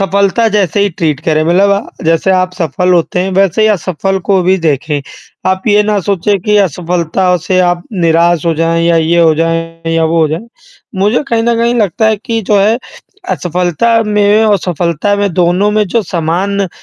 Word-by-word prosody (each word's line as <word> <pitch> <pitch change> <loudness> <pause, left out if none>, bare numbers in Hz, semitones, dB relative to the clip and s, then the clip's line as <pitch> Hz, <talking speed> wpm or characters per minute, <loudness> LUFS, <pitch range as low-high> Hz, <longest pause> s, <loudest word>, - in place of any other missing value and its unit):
सफलता 200 +4 +1
जैसे 205 -2 0
ही 200 - +2
ट्रीट 155 -4 -2
करें 155 -1 +1
मतलब 185 +5 +2
अ, 200 -2 -3
जैसे 165 +3 +1
आप 185 0 0
सफल 180 +1 -1
होते 175 +1 0
हैं 190 +1 -2
वैसे 195 +2 +2
ही 215 - +4
असफल 195 -1 -1
को 195 -2 +3
भी 185 +2 +2
देखें, 150 -2 -1 0.5
आप 190 0 0
ये 210 0 +4
ना 210 0 0
सोचे 200 +1 0
कि 210 - +3
असफलता 180 0 0
से 185 - +1
आप 175 -1 0
निराश 170 -2 +1
हो 165 - +1
जाएँ 165 +1 0
या 170 0 +3
ये 165 +1 +2
हो 160 -2 +4
जाएँ 165 0 -2
या 165 0 +2
वो 165 +1 +1
हो 155 - +1
जाएँ, 170 +10 -5 0.5
मुझे 205 +7 +1
कहीं 230 -1 0
न 235 0 +1
कहीं 235 +1 +1
लगता 215 -1 0
है 220 0 +2
कि 225 +2 -3
जो 205 +1 +1
है 220 +4 +2 0.5
असफलता 180 +6 0
में 210 0 +2
और 210 -2 +2
सफलता 175 +2 -1
में 200 -2 -1
दोनों 180 +3 +1
में 215 0 +2
जो 230 +4 0
समान 180 +3 -2
अ, - - -6
185 Hz, 200 wpm, -12 LUFS, 165-205 Hz, 0.5 s, ही